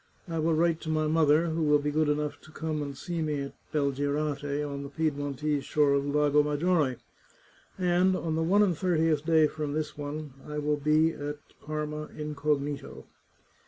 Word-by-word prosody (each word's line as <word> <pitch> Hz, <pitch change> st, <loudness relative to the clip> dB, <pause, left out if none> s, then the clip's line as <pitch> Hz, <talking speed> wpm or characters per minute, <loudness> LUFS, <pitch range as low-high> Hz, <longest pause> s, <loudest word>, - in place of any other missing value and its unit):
I 165 Hz, -1 st, -2 dB
will 160 Hz, +1 st, +2 dB
write 165 Hz, 0 st, +2 dB
to 160 Hz, -, -5 dB
my 155 Hz, 0 st, +1 dB
mother, 155 Hz, 0 st, +4 dB
who 160 Hz, +1 st, -1 dB
will 150 Hz, -1 st, +4 dB
be 145 Hz, 0 st, -2 dB
good 155 Hz, 0 st, +2 dB
enough 150 Hz, 0 st, -1 dB
to 155 Hz, -, -16 dB
come 155 Hz, -1 st, -3 dB
and 140 Hz, -2 st, -5 dB
see 170 Hz, -2 st, -3 dB
me 150 Hz, -2 st, -1 dB
at 140 Hz, -, -6 dB, 0.2 s
Belgirate, 145 Hz, 0 st, 0 dB, 0.3 s
on 140 Hz, -1 st, -5 dB
the 140 Hz, -, -6 dB
Piedmontese 145 Hz, -1 st, -1 dB
shore 145 Hz, -2 st, +2 dB
of 140 Hz, 0 st, +1 dB
the -, -, -2 dB
Lago 150 Hz, 0 st, +4 dB
Maggiore, 150 Hz, -2 st, +1 dB, 0.8 s
and 180 Hz, 0 st, +3 dB
on 165 Hz, -3 st, -2 dB
the 160 Hz, -, 0 dB
one 195 Hz, +6 st, +4 dB
and 185 Hz, -4 st, +2 dB
thirtieth 160 Hz, -3 st, +1 dB
day 160 Hz, -1 st, +4 dB
from 150 Hz, -1 st, -3 dB
this 155 Hz, 0 st, -3 dB
one 145 Hz, 0 st, -6 dB
I 150 Hz, 0 st, -5 dB
will 150 Hz, 0 st, 0 dB
be 155 Hz, +2 st, +3 dB
at 145 Hz, -1 st, -5 dB, 0.3 s
Parma 150 Hz, 0 st, -4 dB
incognito." 150 Hz, -1 st, -2 dB
150 Hz, 185 wpm, -28 LUFS, 145-160 Hz, 0.8 s, mother